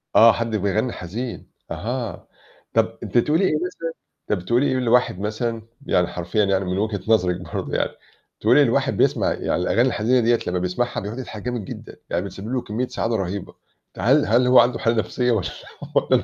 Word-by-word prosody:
آه، 115 +1 +9
حد 115 -1 -2
بيغنّي 105 +4 0
حزين 115 +8 -6 0.2
أها. 120 -1 -4 0.5
طَب - - +1
أنتِ - - -2
تقولي 155 +9 +3
إيه 155 - +2
مثلًا 165 0 -3 0.4
طَب 90 -4 -1
تقولي 120 +6 +2
إيه 130 - +1
لواحد 120 -5 +2
مثلًا 115 +2 -2 0.2
يعني 90 -1 +2
حرفيًا 90 +5 -1
يعني 95 -1 +1
من 90 +1 -2
وِجهة 105 -1 -1
نظرِك 90 -5 +2
برضه - - -3
يعني - - 0 0.5
تقولي - - +5
لواحد - - +1
بيسمع - - +2
يعني - - -2
الأغاني 90 +6 +1
الحزينة 125 +2 +2
دِيّة 115 0 +3
لمّا 90 0 0
بيسمعها 90 +7 -1
بيقعُد 110 +6 -6
يضحك 110 -4 -7
جامد 120 -5 -3
جدًا - - -9
يعني 85 +3 -1
بتسبب 100 +2 -8
له 130 - 0
كمّية 120 +4 -3
سعادة 115 0 -2
رَهيبة، 95 -1 -3 0.4
فهل - - +3
هل 120 +5 +3
هو 125 - +7
عنده 125 +1 +3
حالة 115 0 +1
نَفْسية 125 +3 0
والّا 105 -6 0 0.6
والّا - - +4
115 Hz, 185 wpm, -22 LUFS, 100-125 Hz, 0.6 s, آه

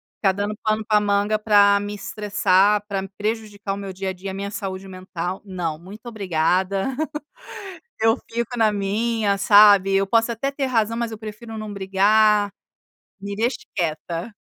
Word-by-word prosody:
ficar 195 -3 +2
dando 205 +2 -3
pano 215 0 0
para 210 -1 +4
manga 205 +1 +1
para 205 -1 +5
me 205 +1 -5
estressar, 205 0 +1
para 195 -2 -2
me 195 - -8
prejudicar 210 -2 -3
o - - -8
meu 195 -1 -6
dia 190 0 -4
a - - -3
dia, 190 +1 -7
minha 200 +1 -4
saúde 195 -2 -6
mental 185 -1 -5
não 175 -5 -3
muito 200 +8 -13
obrigada, 190 +3 0 1.1
eu 225 0 +4
fico 235 +1 -3
na 220 -1 +4
minha, 205 +1 0
sabe? 200 -1 +6
Eu 195 0 +3
posso 230 +3 +2
até 275 +5 -2
ter 275 0 -2
razão 230 -3 0
mas 235 -1 -2
eu 220 - -6
prefiro 220 +1 -8
não 215 -1 -6
brigar, 205 +2 +3 0.7
me 200 0 -6
deixe 240 +3 0 0.2
quieta. 170 +4 -3
205 Hz, 165 wpm, -22 LUFS, 195-220 Hz, 1.1 s, sabe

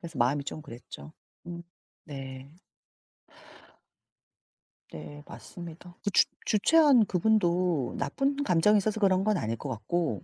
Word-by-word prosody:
그래서 165 -1 -8
마음이 140 +4 +1
좀 155 - -6
그랬죠. 125 +3 -11 0.3
음 170 0 -7 0.4
네. 135 -2 -8 2.4
네 145 - -9
맞습니다. 175 0 -11
그 - - 0
주 - - +5 0.2
주최한 265 +2 +5
그분도 180 - +1
나쁜 275 +1 -1
감정이 210 0 +4
있어서 215 +2 -1
그런 190 -2 +3
건 215 -1 +2
아닐 115 -6 -2
것 - - -7
같고 115 - -2
170 Hz, 240 characters per minute, -28 LUFS, 140-210 Hz, 2.4 s, 주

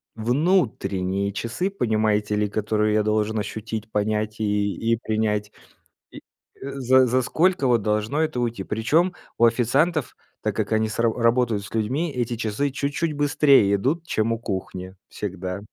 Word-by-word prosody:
внутренние 110 - 0
часы, 115 - -2
понимаете 110 - 0
ли, 105 0 +1
которые 105 +1 0
я 110 - +3
должен 110 +1 0
ощутить, 110 +1 -5
понять 105 +1 -1
и 105 -1 0 0.2
и 115 - +1
принять. 105 -2 -1 0.6
И, - - -12
э, 140 - -12
за 130 -1 +4
за 125 +1 +2
сколько 165 +2 +1
вот 120 -3 +3
должно 105 +7 0
это 155 -5 -1
уйти? 120 -4 -2
Причем 150 - +1 0.2
у 120 - +5
официантов, 130 +6 +1 0.3
так - - -2
как - - -2
они 110 0 +1
с 105 - -6
ра 115 -1 +3
работают 115 -3 +1
с 105 - -11
людьми, 135 +10 -1
эти 120 -2 -2
часы 115 +5 -1
чуть-чуть 145 +4 -2
быстрее 140 -7 +4
идут, 145 - -1
чем 110 -4 0
у 115 - -4
кухни 95 -3 -5
всегда. 95 -1 -5
110 Hz, 155 wpm, -23 LUFS, 105-130 Hz, 0.6 s, у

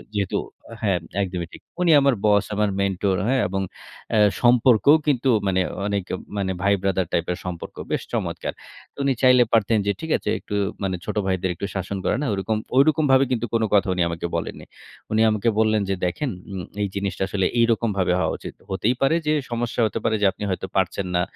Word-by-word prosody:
যেহেতু 100 -2 0 0.4
হ্যাঁ, 95 -5 +1 0.2
একদমই 90 -3 -4
ঠিক। - - -11 0.2
উনি 175 - +4
আমার 140 -1 +4
বস, 105 -1 +4
আমার 105 0 +1
মেন্টর 95 0 0
হ্যাঁ? 130 0 +2
এবং 95 0 -1 0.5
অ্যা 110 - +3 0.2
সম্পর্কও 125 +2 +5
কিন্তু 135 -2 +2 0.2
মানে 95 -1 +2 0.3
অনেক 100 -2 -1 0.3
মানে, 95 -2 -1
ভাই-ব্রাদার 95 -2 +1
টাইপের 90 +1 0
সম্পর্ক, 90 -2 -6 0.2
বেশ - - 0
চমৎকার! - - -2 0.4
তো - - -45
উনি 135 -1 +2
চাইলে 125 -1 +7
পারতেন 110 0 +3
যে - - +4
ঠিক 160 - -4
আছে - - -4
একটু 105 - -6 0.3
মানে, 95 -1 0
ছোট 105 - -4
ভাইদের 95 -1 0
একটু 100 - -4
শাসন 95 +1 -3
করে - - +2
না? - - -1
ঐরকম। 100 +3 -1 0.2
ঐরকম 155 +3 +4
ভাবে 130 +1 +6
কিন্তু 120 -1 0
কোন 115 -1 +2
কথা 100 -1 +4
উনি 90 - -1
আমাকে 85 +1 -3
বলেননি। - - -4 0.5
উনি 110 0 +2
আমাকে 110 +2 +1
বললেন 110 -1 +3
যে, 95 - +2
"দেখেন 125 +11 -2 0.2
উম 95 -2 -5 0.2
এই 100 - +1
জিনিসটা 100 -1 -2
আসলে 95 -1 0
এইরকমভাবে 110 -6 +2
হওয়া - - +1
উচিত। - - -8 0.2
হতেই 110 +6 0
পারে 135 +4 +3
যে, 150 - +3 0.2
সমস্যা 120 0 -1
হতে 105 - -4
পারে 110 -1 +2
যে - - +4
আপনি 100 - -9
হয়তো 95 0 -3
পারছেন 95 0 0
না। 90 - +3
100 Hz, 195 wpm, -23 LUFS, 95-120 Hz, 0.5 s, চাইলে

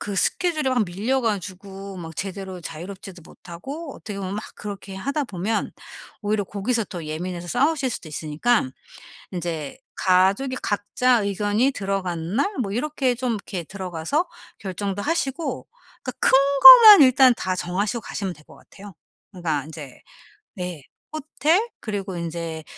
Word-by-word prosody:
그 205 - -4
스케줄이 310 - +1
막 250 -4 +2
밀려 210 +9 -1
가지고 195 -2 -4
막 165 -2 -8
제대로 190 -1 -5
자유롭지도 180 +3 -9
못하고 270 - -9
어떻게 205 -3 -8
보면 190 0 -4
막 215 - -4
그렇게 200 -1 -7
하다 280 +9 -2
보면 205 +1 -2 0.5
오히려 205 0 0
거기서 215 +4 -1
더 175 -5 -7
예민해서 175 +3 -5
싸우실 275 - +1
수도 170 - -6
있으니깐 155 - 0 0.6
인제 170 - -4 0.2
가족이 195 +8 +2
각자 235 +4 +1
의견이 205 +5 +1
들어간 190 -5 -3
날 395 +9 +1
뭐 195 - -4
이렇게 265 +1 0
좀 250 0 -2
이렇게 195 -3 -6
들어가서 190 - -2 0.3
결정도 200 0 -4
하시고 280 -1 -2 0.4
그러니까 255 - -3
큰 - - +4 0.3
거만 455 -7 +12
일단 260 -1 +6
다 185 - -1
정하시고 200 +6 -2
가시면 195 -3 -4
될 150 -2 -19
것 - - -16
같아요. 200 -2 -14 0.4
그러니까 160 -7 -2
인제 150 -4 -10 0.6
네 180 -5 -5 0.3
호텔 310 +7 +1
그리고 200 -4 -4
인제 165 -1 -5
200 Hz, 325 characters per minute, -23 LUFS, 180-255 Hz, 0.6 s, 거만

